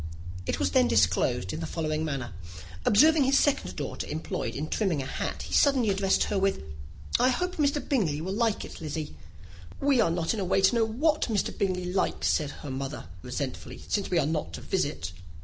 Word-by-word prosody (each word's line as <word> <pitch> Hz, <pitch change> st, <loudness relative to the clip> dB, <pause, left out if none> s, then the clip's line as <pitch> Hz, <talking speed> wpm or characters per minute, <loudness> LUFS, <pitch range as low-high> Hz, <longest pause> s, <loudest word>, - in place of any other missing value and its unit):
It -, -, 0 dB
was -, -, 0 dB
then 255 Hz, -2 st, +4 dB
disclosed 100 Hz, +2 st, +2 dB
in -, -, -4 dB
the 165 Hz, -, -3 dB
following 155 Hz, -1 st, -2 dB
manner. 135 Hz, -, -3 dB, 0.5 s
Observing 300 Hz, +6 st, +6 dB
his 275 Hz, +1 st, +4 dB
second 290 Hz, -, +1 dB
daughter -, -, -4 dB
employed 150 Hz, -6 st, -3 dB
in 150 Hz, +3 st, -3 dB
trimming 185 Hz, -4 st, 0 dB
a 135 Hz, -, -3 dB
hat, 135 Hz, -, -4 dB
he -, -, -7 dB
suddenly 260 Hz, -7 st, +4 dB
addressed 195 Hz, 0 st, +2 dB
her 205 Hz, -, 0 dB
with, 195 Hz, -, 0 dB, 0.6 s
"I 255 Hz, -, +5 dB
hope 360 Hz, +8 st, -1 dB
Mr. 290 Hz, -1 st, +1 dB
Bingley 180 Hz, -, +1 dB
will 185 Hz, +4 st, -3 dB
like 225 Hz, 0 st, 0 dB
it, -, -, -10 dB
Lizzy." 155 Hz, -, -4 dB, 0.6 s
"We 275 Hz, -3 st, +3 dB
are 190 Hz, -, +3 dB
not 165 Hz, +2 st, 0 dB
in 220 Hz, -, -3 dB
a -, -, 0 dB
way 190 Hz, +1 st, +2 dB
to 190 Hz, -, +5 dB
know 230 Hz, -1 st, +3 dB
what 295 Hz, +8 st, +1 dB
Mr. 210 Hz, -3 st, 0 dB
Bingley 185 Hz, -2 st, -1 dB
likes," 190 Hz, -, +1 dB
said 150 Hz, -3 st, +1 dB, 0.2 s
her 140 Hz, -, -4 dB
mother, 135 Hz, -, -5 dB
resentfully, 130 Hz, +3 st, -5 dB
"since 200 Hz, -, -1 dB
we 180 Hz, -, +1 dB
are 155 Hz, -, +3 dB
not 150 Hz, -, -2 dB
to 75 Hz, -, -6 dB
visit." 80 Hz, +3 st, -2 dB
185 Hz, 200 wpm, -28 LUFS, 145-235 Hz, 0.6 s, Observing